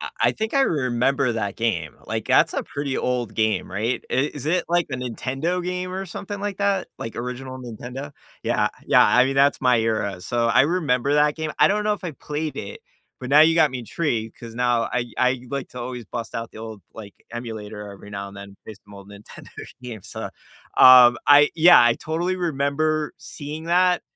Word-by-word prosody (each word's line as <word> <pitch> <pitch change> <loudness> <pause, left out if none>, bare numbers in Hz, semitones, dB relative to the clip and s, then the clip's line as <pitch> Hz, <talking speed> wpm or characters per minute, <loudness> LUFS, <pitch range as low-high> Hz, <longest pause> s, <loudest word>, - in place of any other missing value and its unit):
I - - -5
I - - +4
think 220 +4 -4
I 275 - +4
remember 130 - +1
that 105 -3 -3
game. 90 -10 -2
Like, - - -4
that's - - +3
a - - -1
pretty 140 -2 -4
old 120 -4 -2
game, 110 -4 0
right? 110 +6 -2
It 140 +4 0
is 145 -1 -6
it, 175 +3 +1
like, 175 0 +1
the 130 - -4
Nintendo 135 +8 -3
game 180 0 -4
or 190 +1 -4
something 200 +3 -7
like 205 -1 -3
that? 200 -1 0
Like, 115 - -7
original 125 +2 -6
Nintendo? 125 +3 -8 0.3
Yeah, - - +1 0.2
yeah, - - +6
I 125 - +5
mean, 135 - -2
that's 140 +1 +3
my 125 -2 +3
era. 105 -4 -1
So, 120 +3 0
I 115 +3 +5
remember 145 -5 +1
that 150 0 +3
game, 155 -1 -4
I - - +6
don't 210 +1 0
know 210 - +2
if 205 - -5
I 165 - -4
played 150 +2 -5
it, 455 - -7 0.4
but 125 - -6
now 145 +3 +6
you 165 +1 +6
got 155 -4 +4
me 130 - -5
intrigued 115 -3 -3
'cause 115 -1 -10
now 120 -1 +1
I 125 -1 0
I 125 0 +1
like 140 -2 -4
to 125 - -9
always 120 -2 -6
bust 115 +2 -6
out 115 -1 -4
the - - -13
old, 110 -2 -8
like, 105 -3 -10 0.2
emulator 110 -3 -7
every 100 +1 -13
now 100 -1 -6
and 100 - -13
then 100 0 -11
based 105 -2 -11
on 105 - -13
old 100 0 -13
Nintendo 100 +1 -13 0.3
games. 115 -6 -9
So, - - -6 0.5
um, 125 -2 +9
I 145 0 +7
yeah, 170 -1 +7
I 120 0 +5
totally 170 +6 -2
remember 155 -2 -1
seeing 150 +2 -8
that, 180 +1 +2
130 Hz, 210 wpm, -23 LUFS, 115-155 Hz, 0.5 s, um